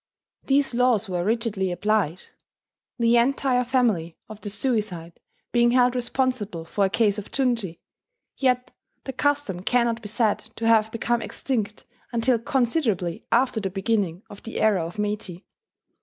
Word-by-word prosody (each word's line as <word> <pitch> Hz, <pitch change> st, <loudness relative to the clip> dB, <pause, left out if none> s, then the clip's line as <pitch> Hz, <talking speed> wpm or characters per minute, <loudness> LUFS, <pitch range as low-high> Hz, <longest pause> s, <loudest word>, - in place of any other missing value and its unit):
These 275 Hz, -1 st, +2 dB
laws 240 Hz, -3 st, +2 dB
were 180 Hz, -2 st, -2 dB
rigidly 215 Hz, -3 st, 0 dB
applied, 185 Hz, -2 st, 0 dB, 0.7 s
the 235 Hz, 0 st, +4 dB
entire 255 Hz, +1 st, +2 dB
family 220 Hz, -11 st, +1 dB
of 215 Hz, -1 st, -10 dB
the 205 Hz, -, -5 dB
suicide 200 Hz, -7 st, -2 dB, 0.3 s
being 240 Hz, 0 st, +4 dB
held 250 Hz, 0 st, +4 dB
responsible 240 Hz, -8 st, -1 dB
for 200 Hz, +4 st, +1 dB
a -, -, +1 dB
case 210 Hz, 0 st, +2 dB
of 205 Hz, -, -9 dB
junshi: 235 Hz, -10 st, -1 dB, 0.6 s
yet 250 Hz, -2 st, +1 dB, 0.3 s
the 265 Hz, -, -5 dB
custom 280 Hz, -9 st, 0 dB
cannot 235 Hz, +2 st, +1 dB
be 210 Hz, -, -7 dB
said 225 Hz, -1 st, +1 dB, 0.2 s
to 230 Hz, -, -4 dB
have 220 Hz, -1 st, +4 dB
become 235 Hz, +1 st, 0 dB
extinct 220 Hz, -6 st, -3 dB, 0.3 s
until 235 Hz, 0 st, +2 dB
considerably 230 Hz, -, 0 dB
after 245 Hz, -1 st, +3 dB
the 195 Hz, -2 st, -2 dB
beginning 195 Hz, -2 st, -1 dB
of 200 Hz, -, -12 dB
the 230 Hz, -, -6 dB
era 205 Hz, -6 st, +3 dB
of 170 Hz, +4 st, -7 dB
Meiji. 205 Hz, -3 st, -3 dB
225 Hz, 145 wpm, -24 LUFS, 195-245 Hz, 0.7 s, the